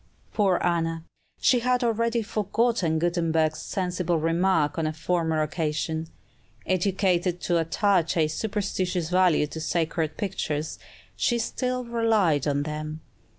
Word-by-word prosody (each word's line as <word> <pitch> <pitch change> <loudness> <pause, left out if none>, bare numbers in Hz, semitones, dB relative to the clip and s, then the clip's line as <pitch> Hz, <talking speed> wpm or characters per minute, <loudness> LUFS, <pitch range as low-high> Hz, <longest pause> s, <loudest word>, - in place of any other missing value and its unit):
Poor 195 -4 +2
Anna! 165 -2 0 0.4
she 250 - +4
had 250 +1 +1
already 230 0 +1
forgotten 210 -4 0
Gutenberg's 165 -2 +1
sensible 180 -2 -1
remark 165 -1 +1
on 160 - 0
a 155 - -2
former 160 -1 0
occasion. 160 +1 -2 0.6
Educated 185 -1 +1
to 175 -1 +1
attach 170 +1 +1
a 155 -2 +3
superstitious 185 -1 -2
value 180 -4 +4
to 160 +2 -7
sacred 160 -1 -1
pictures, 155 -6 -3 0.4
she 240 - +1
still 250 +2 -2
relied 220 - +2
on 145 0 +1
them. 155 +1 -5
175 Hz, 120 wpm, -26 LUFS, 160-200 Hz, 0.6 s, she